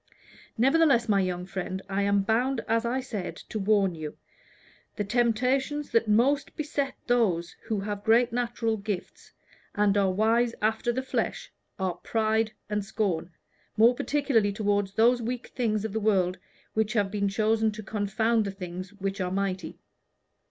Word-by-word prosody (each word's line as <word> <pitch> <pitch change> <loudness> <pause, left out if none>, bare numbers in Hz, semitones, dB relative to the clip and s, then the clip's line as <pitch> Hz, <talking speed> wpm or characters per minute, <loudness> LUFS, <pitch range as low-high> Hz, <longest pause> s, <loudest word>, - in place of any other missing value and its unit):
Nevertheless, 270 -1 +4
my 205 -2 +3
young 180 -1 -2
friend, 190 0 -4
I 200 0 -1
am 200 0 +2
bound, 235 +4 +1
as 230 +1 +1
I 255 +3 0
said, 215 -8 -5
to 220 - -3
warn 200 -2 +2
you. 155 -2 -7 0.8
The 210 - -1
temptations 250 +6 0
that 230 -1 +2
most 255 +8 +2
beset 290 -2 -2
those 190 -9 +1
who 215 -3 -1
have 205 0 -4
great 230 +2 +4
natural 235 -2 -1
gifts, 200 -2 -6 0.4
and 205 -1 +3
are 200 -2 +3
wise 230 +4 +2
after 220 +2 +1
the 260 +2 -2
flesh, - - -2 0.3
are 185 -2 -2
pride 220 +2 0 0.2
and 210 0 -1
scorn, 195 -5 -1 0.5
more 230 +3 +6
particularly 250 -6 +1
toward 205 -1 0
those 240 +3 +4
weak 240 +2 -3
things 220 -4 -1
of 215 - -4
the 220 - 0
world 190 -4 +1 0.3
which 215 -1 0
have 205 -4 +1
been 200 -1 0
chosen 220 +2 +2
to 215 0 -8
confound 215 +3 0
the - - -2
things 185 0 -7
which 195 0 -3
are 180 - -1
mighty. 190 -3 -2
215 Hz, 160 wpm, -27 LUFS, 195-235 Hz, 0.8 s, more